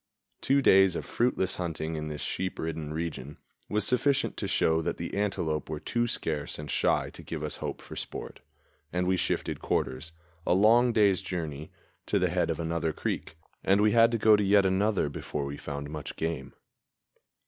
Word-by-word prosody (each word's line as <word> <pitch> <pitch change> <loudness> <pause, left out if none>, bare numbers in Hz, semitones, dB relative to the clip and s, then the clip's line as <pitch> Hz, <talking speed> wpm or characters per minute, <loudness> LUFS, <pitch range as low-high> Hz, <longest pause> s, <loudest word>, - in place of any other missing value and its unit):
Two 140 +1 +3
days 95 -4 +6
of - - -4
fruitless 115 -6 0
hunting 80 -2 -3
in 75 -1 -4
this 75 -2 -5
sheep 95 0 -2
ridden 80 -2 -4
region 75 -3 -5 0.3
was 105 -1 0
sufficient 135 +2 +2
to - - -2
show 80 0 +2
that 80 - -2
the 85 - -5
antelope 85 -8 -1
were 80 -1 -3
too 120 +7 -1
scarce 75 -9 -1
and 75 -1 -6
shy - - +1
to - - -10
give 80 -2 -6
us 75 - -2
hope - - -5
for - - -9
sport, - - -6 0.5
and 90 0 0
we 95 +1 +2
shifted - - -1
quarters, 65 +6 -2 0.3
a 90 - +2
long 115 +5 +5
day's 100 -4 +3
journey, 80 -5 -5 0.4
to - - +2
the - - +1
head - - +1
of - - -2
another 85 0 -1
creek; 80 - -4 0.3
and 100 +1 +4
we 105 0 +4
had 115 0 +6
to 115 - +1
go 110 0 +6
to 105 - +1
yet 100 0 +5
another 95 0 +2
before 70 0 -4
we 70 +1 -5
found 70 0 -6
much 75 -1 -6
game. 75 -5 -4
85 Hz, 190 wpm, -28 LUFS, 75-105 Hz, 0.5 s, days